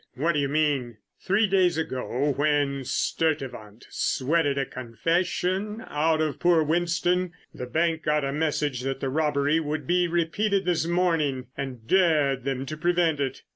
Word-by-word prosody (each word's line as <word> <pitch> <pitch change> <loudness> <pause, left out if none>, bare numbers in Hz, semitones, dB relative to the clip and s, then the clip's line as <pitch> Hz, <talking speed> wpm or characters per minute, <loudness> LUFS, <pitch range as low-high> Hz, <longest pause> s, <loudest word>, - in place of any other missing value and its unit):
"What 160 +6 +1
do 150 - 0
you 140 -1 0
mean?" 140 -6 0 0.2
"Three 200 +4 +2
days 185 -4 +2
ago 135 -1 -1
when 145 -2 +1
Sturtevant 125 -7 -2
sweated 145 +1 0
a 135 - 0
'confession' 180 - -2
out 155 +1 +1
of 155 -2 -2
poor 170 -2 +4
Winston, 175 +2 0 0.2
the 125 - -6
bank 165 +3 0
got 150 -1 +1
a 135 - -2
message 150 -4 -1
that 135 +1 -3
the 135 - -2
robbery 150 +1 +1
would 150 -2 -3
be 175 +3 +2
repeated 190 +4 0
this 165 -2 +1
morning 160 -8 0
and 130 -5 -6
dared 150 -8 +2
them 135 -1 -2
to 155 - -5
prevent 170 -2 +1
it. 135 -2 -3
155 Hz, 155 wpm, -26 LUFS, 135-170 Hz, 0.2 s, poor